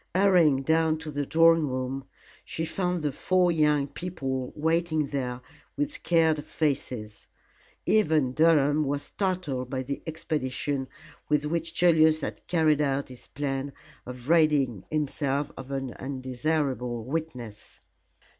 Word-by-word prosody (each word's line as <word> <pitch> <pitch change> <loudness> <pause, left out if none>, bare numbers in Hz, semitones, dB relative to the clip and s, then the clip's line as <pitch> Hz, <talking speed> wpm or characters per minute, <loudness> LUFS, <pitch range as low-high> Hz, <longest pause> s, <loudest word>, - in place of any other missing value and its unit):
Hurrying 175 -8 +4
down 160 +1 +2
to 155 -1 -7
the 145 -1 -3
drawing 165 -1 +5
room, 130 +1 -3 0.4
she 160 - -4
found 180 -1 -2
the 145 - 0
four 180 +5 +2
young 150 -3 +3
people 135 -5 -4
waiting 160 0 +1
there 130 -3 -3 0.4
with 290 0 0
scared 160 - +2
faces. 125 -10 -3 0.6
Even 155 -11 +3
Durham 150 -1 +4
was 145 0 -2
startled 175 -10 -2
by 130 -1 -2
the 140 +2 -4
expedition 145 -3 -2 0.4
with 150 0 +2
which 165 +1 -2
Julius 160 -3 +4
had - - -6
carried 155 -4 +3
out 140 -1 0
his 125 -1 -12
plan 140 0 -3 0.3
of 125 0 -8
ridding 150 - +3
himself 145 -1 -1
of 130 0 -9
an 135 -3 -3
undesirable 130 -2 -2
witness. 125 -8 -6
145 Hz, 125 wpm, -27 LUFS, 135-160 Hz, 0.6 s, drawing